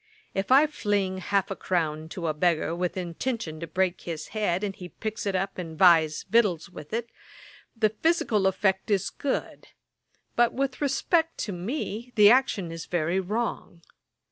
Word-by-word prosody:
If 195 Hz, +5 st, -2 dB
I 275 Hz, +4 st, +8 dB
fling 205 Hz, -9 st, -1 dB
half 195 Hz, +1 st, 0 dB
a -, -, -2 dB
crown 160 Hz, -4 st, -2 dB
to 170 Hz, 0 st, -5 dB
a 155 Hz, -, +1 dB
beggar 165 Hz, 0 st, +1 dB
with 180 Hz, +1 st, -2 dB
intention 175 Hz, -1 st, -3 dB
to 170 Hz, -, -5 dB
break 185 Hz, +1 st, 0 dB
his 160 Hz, -3 st, -6 dB
head, 205 Hz, -3 st, -1 dB
and 195 Hz, -2 st, -2 dB
he 180 Hz, -1 st, -9 dB
picks 220 Hz, +1 st, -5 dB
it 195 Hz, -, 0 dB
up 190 Hz, 0 st, -2 dB
and 165 Hz, -3 st, -6 dB
buys 160 Hz, -4 st, +5 dB
victuals 195 Hz, -6 st, +2 dB
with 150 Hz, -, -10 dB
it, 230 Hz, +1 st, -3 dB, 0.7 s
the 220 Hz, -1 st, +3 dB
physical 220 Hz, -, +1 dB
effect 190 Hz, 0 st, 0 dB
is 200 Hz, -3 st, +1 dB
good; 280 Hz, -, -3 dB, 0.7 s
but, 240 Hz, 0 st, +3 dB
with 270 Hz, 0 st, -2 dB
respect 320 Hz, +4 st, +1 dB
to 210 Hz, -, -3 dB
me, 225 Hz, -, -4 dB
the 210 Hz, -1 st, +8 dB
action 225 Hz, -9 st, +2 dB
is 165 Hz, 0 st, -7 dB
very 175 Hz, +1 st, 0 dB
wrong. 195 Hz, -3 st, -3 dB
195 Hz, 170 wpm, -27 LUFS, 175-225 Hz, 0.7 s, I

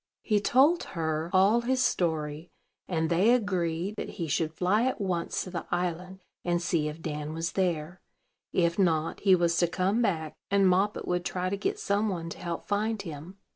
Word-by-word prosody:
He 210 Hz, -2 st, +2 dB
told 280 Hz, +11 st, +4 dB
her 160 Hz, 0 st, -1 dB
all 200 Hz, +5 st, +4 dB
his 255 Hz, +1 st, +1 dB
story; 160 Hz, -3 st, -1 dB, 0.4 s
and 160 Hz, -3 st, 0 dB
they 175 Hz, +6 st, +3 dB
agreed 185 Hz, -3 st, -1 dB
that -, -, -4 dB
he 170 Hz, -4 st, -2 dB
should 155 Hz, +2 st, 0 dB
fly 190 Hz, +8 st, +1 dB
at 260 Hz, -, -1 dB
once 180 Hz, -4 st, -1 dB
to 185 Hz, -, -8 dB
the 170 Hz, -3 st, -5 dB
island, 180 Hz, +1 st, -3 dB, 0.2 s
and 175 Hz, -1 st, +1 dB
see 170 Hz, -3 st, 0 dB
if 155 Hz, +2 st, -7 dB
Dan 150 Hz, 0 st, -4 dB
was 165 Hz, +1 st, -2 dB
there; 180 Hz, -2 st, -1 dB, 0.5 s
if 170 Hz, +1 st, +1 dB
not, 165 Hz, -4 st, +1 dB
he 195 Hz, -2 st, +5 dB
was 170 Hz, -1 st, +2 dB
to 175 Hz, -, +3 dB
come 190 Hz, +6 st, 0 dB
back, 160 Hz, -8 st, 0 dB, 0.2 s
and 200 Hz, -1 st, +4 dB
Moppet 195 Hz, +3 st, +1 dB
would 180 Hz, 0 st, 0 dB
try 185 Hz, +1 st, -2 dB
to -, -, +1 dB
get 200 Hz, -, -2 dB
some 205 Hz, +2 st, 0 dB
one 170 Hz, -3 st, -4 dB
to -, -, -8 dB
help 170 Hz, -2 st, -4 dB
find 210 Hz, +1 st, -1 dB
him. 165 Hz, +2 st, -8 dB
180 Hz, 190 wpm, -28 LUFS, 165-200 Hz, 0.5 s, he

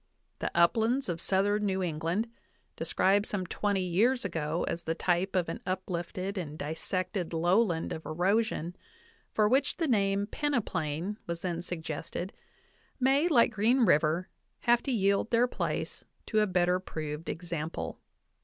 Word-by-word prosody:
The -, -, -1 dB
uplands 225 Hz, +8 st, +3 dB
of 170 Hz, -1 st, -2 dB
southern 205 Hz, +2 st, +2 dB
New 190 Hz, -1 st, 0 dB
England, 170 Hz, +6 st, -1 dB, 0.5 s
described 200 Hz, +3 st, +2 dB
some 190 Hz, -3 st, -2 dB
twenty 200 Hz, +1 st, 0 dB
years 215 Hz, +8 st, +2 dB
ago 165 Hz, -2 st, -1 dB
as 170 Hz, -, -2 dB
the 165 Hz, -, -1 dB
type 180 Hz, +3 st, 0 dB
of 180 Hz, -2 st, +2 dB
an -, -, -4 dB
uplifted 185 Hz, +1 st, -3 dB
and 155 Hz, -4 st, -6 dB
dissected 175 Hz, +4 st, -3 dB
lowland 175 Hz, +1 st, +2 dB
of 160 Hz, -, -6 dB
erosion, 180 Hz, +1 st, 0 dB, 0.6 s
for 215 Hz, -1 st, +3 dB
which 270 Hz, +5 st, +2 dB
the 330 Hz, -, 0 dB
name 200 Hz, -4 st, +2 dB
peneplain 200 Hz, -, -2 dB
was 170 Hz, 0 st, -4 dB
then 175 Hz, -2 st, -2 dB
suggested, 170 Hz, +1 st, -5 dB, 0.7 s
may, 270 Hz, +5 st, +4 dB
like 245 Hz, -10 st, +5 dB
Green 230 Hz, +5 st, +3 dB
River, 165 Hz, +2 st, +3 dB, 0.3 s
have 240 Hz, 0 st, +4 dB
to 275 Hz, -, -3 dB
yield 200 Hz, -1 st, +2 dB
their 235 Hz, +1 st, +4 dB
place -, -, -3 dB, 0.2 s
to 215 Hz, -, +1 dB
a 210 Hz, -, +3 dB
better 180 Hz, -1 st, +2 dB
proved 155 Hz, -3 st, -5 dB
example. 165 Hz, -2 st, -4 dB
185 Hz, 145 wpm, -30 LUFS, 170-215 Hz, 0.7 s, like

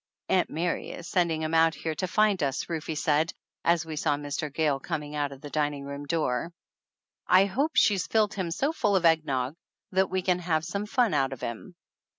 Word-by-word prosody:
"Aunt 185 Hz, -2 st, +2 dB
Mary 170 Hz, +3 st, -2 dB
is 170 Hz, -, -8 dB
sending 170 Hz, -3 st, +1 dB
him 155 Hz, +1 st, -2 dB
out 165 Hz, -1 st, +4 dB
here 160 Hz, +2 st, -3 dB
to 185 Hz, -, -3 dB
find 210 Hz, 0 st, +2 dB
us," 135 Hz, -2 st, -1 dB
Rufe 160 Hz, -2 st, -3 dB
said, 155 Hz, +2 st, +1 dB, 0.3 s
as 170 Hz, -1 st, +2 dB
we 160 Hz, -1 st, -5 dB
saw 150 Hz, -1 st, +1 dB
Mr. 145 Hz, +1 st, -4 dB
Gayle 145 Hz, -2 st, +1 dB
coming 150 Hz, +1 st, -4 dB
out 145 Hz, -1 st, -1 dB
of 135 Hz, -1 st, -11 dB
the 145 Hz, -, -9 dB
dining 145 Hz, -2 st, -1 dB
room 140 Hz, +1 st, -6 dB
door. 155 Hz, -2 st, -1 dB, 0.8 s
"I 185 Hz, +2 st, +6 dB
hope 275 Hz, +11 st, -1 dB
she's 195 Hz, -5 st, +3 dB
filled 215 Hz, -2 st, +2 dB
him 185 Hz, -4 st, -2 dB
so 270 Hz, -, 0 dB
full 210 Hz, -10 st, +1 dB
of 180 Hz, -2 st, +2 dB
egg 160 Hz, -1 st, +4 dB
nog 130 Hz, 0 st, -1 dB, 0.4 s
that 190 Hz, 0 st, +2 dB
we 185 Hz, -1 st, -1 dB
can 180 Hz, -1 st, +2 dB
have 165 Hz, -2 st, 0 dB
some 200 Hz, +4 st, -3 dB
fun 240 Hz, -3 st, +2 dB
out 135 Hz, -2 st, +1 dB
of 130 Hz, -, -10 dB
him 120 Hz, -, -6 dB
160 Hz, 210 wpm, -27 LUFS, 145-185 Hz, 0.8 s, I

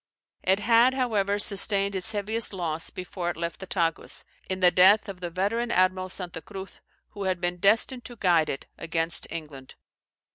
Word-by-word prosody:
It 190 Hz, +1 st, +3 dB
had, 235 Hz, +4 st, +4 dB
however, 205 Hz, -6 st, 0 dB
sustained 200 Hz, 0 st, +3 dB
its 195 Hz, +3 st, 0 dB
heaviest 215 Hz, +2 st, -1 dB
loss 165 Hz, -4 st, -1 dB
before 180 Hz, -1 st, -5 dB
it 175 Hz, -, -4 dB
left 170 Hz, 0 st, -4 dB
the 190 Hz, -, -8 dB
Tagus, 165 Hz, -4 st, -2 dB, 0.2 s
in 185 Hz, 0 st, -2 dB
the 180 Hz, -1 st, +5 dB
death 195 Hz, +5 st, +5 dB
of 195 Hz, -2 st, -7 dB
the 175 Hz, -1 st, -4 dB
veteran 205 Hz, +7 st, -1 dB
admiral 185 Hz, -2 st, +1 dB
Santa 180 Hz, -3 st, -7 dB
Cruz, 195 Hz, +3 st, -10 dB, 0.3 s
who 200 Hz, -1 st, -6 dB
had 185 Hz, -1 st, 0 dB
been 175 Hz, 0 st, -2 dB
destined 225 Hz, +6 st, +2 dB
to 240 Hz, -, -9 dB
guide 175 Hz, -7 st, +2 dB
it 135 Hz, -, -5 dB
against 165 Hz, 0 st, -2 dB
England. 150 Hz, -5 st, -8 dB
190 Hz, 175 wpm, -26 LUFS, 175-205 Hz, 0.3 s, the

